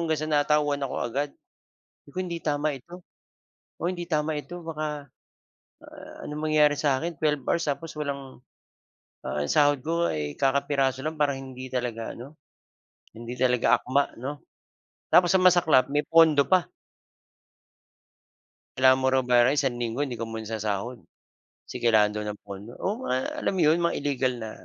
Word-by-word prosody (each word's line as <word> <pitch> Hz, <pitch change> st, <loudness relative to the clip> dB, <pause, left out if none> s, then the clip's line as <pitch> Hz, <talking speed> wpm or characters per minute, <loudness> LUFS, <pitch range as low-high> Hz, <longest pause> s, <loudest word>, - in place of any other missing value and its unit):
hanggang 160 Hz, -2 st, 0 dB
sa -, -, -5 dB
natauhan 145 Hz, -1 st, +2 dB
ako 135 Hz, -, -3 dB
agad. 140 Hz, +5 st, -2 dB, 0.7 s
Sabi -, -, -19 dB
ko -, -, -2 dB
hindi 170 Hz, -2 st, -4 dB
tama 150 Hz, 0 st, 0 dB
ito, 170 Hz, +7 st, -11 dB, 0.7 s
oo, 170 Hz, -, -2 dB
hindi 175 Hz, -2 st, -6 dB
tama 155 Hz, -2 st, 0 dB
ito 175 Hz, +3 st, -9 dB
baka 150 Hz, -4 st, -5 dB, 0.7 s
a -, -, -17 dB, 0.4 s
anong 150 Hz, +1 st, -5 dB
mangyari 150 Hz, -1 st, +5 dB
sa 140 Hz, -2 st, +1 dB
akin, 170 Hz, +4 st, -4 dB
12 150 Hz, -1 st, 0 dB
hours 170 Hz, -, +1 dB
tapos 160 Hz, +3 st, -5 dB
walang, 140 Hz, -4 st, -6 dB, 0.8 s
ah, 75 Hz, +2 st, -2 dB
yung 75 Hz, -, -3 dB
sahod 145 Hz, -3 st, +3 dB
ko 170 Hz, +3 st, 0 dB
ay 75 Hz, -2 st, -3 dB
kakapiraso 135 Hz, -1 st, +1 dB
lang 155 Hz, +2 st, -4 dB
parang 140 Hz, -2 st, 0 dB
hindi 130 Hz, -1 st, -8 dB
talaga 120 Hz, -3 st, -4 dB
ano, 135 Hz, +6 st, -11 dB, 0.7 s
hindi 115 Hz, +2 st, -8 dB
talaga 125 Hz, -1 st, +3 dB
akma 140 Hz, +3 st, 0 dB
'no. 145 Hz, +3 st, -4 dB, 0.7 s
Tapos 175 Hz, 0 st, +5 dB
ang 185 Hz, -1 st, +6 dB
masaklap 160 Hz, -7 st, +3 dB
may 145 Hz, +1 st, 0 dB
pondo 160 Hz, -4 st, +5 dB
pa. 185 Hz, -2 st, +2 dB, 2.1 s
Kailangan 130 Hz, 0 st, +5 dB
mo -, -, +4 dB
raw 130 Hz, -, +4 dB
bayaran 125 Hz, 0 st, +4 dB
yung 145 Hz, -, +2 dB
isang 130 Hz, -4 st, -1 dB
linggo 120 Hz, +1 st, -3 dB
hindi 135 Hz, -4 st, -2 dB
ko 115 Hz, -, -4 dB
muna 110 Hz, -1 st, -6 dB
sasahod. 110 Hz, +2 st, -3 dB, 0.7 s
Kasi -, -, -8 dB
kailangan 110 Hz, -3 st, +4 dB
daw 105 Hz, 0 st, -4 dB
ng 105 Hz, 0 st, -6 dB
pondo, 100 Hz, +3 st, -9 dB
oo, 220 Hz, +7 st, -3 dB
ma 130 Hz, +1 st, 0 dB, 0.2 s
alam -, -, 0 dB
mo -, -, 0 dB
'yon, 155 Hz, +3 st, +4 dB
mga 170 Hz, 0 st, +1 dB
illegal 135 Hz, -3 st, 0 dB
na, 110 Hz, -2 st, -6 dB
140 Hz, 170 wpm, -26 LUFS, 125-155 Hz, 2.1 s, ang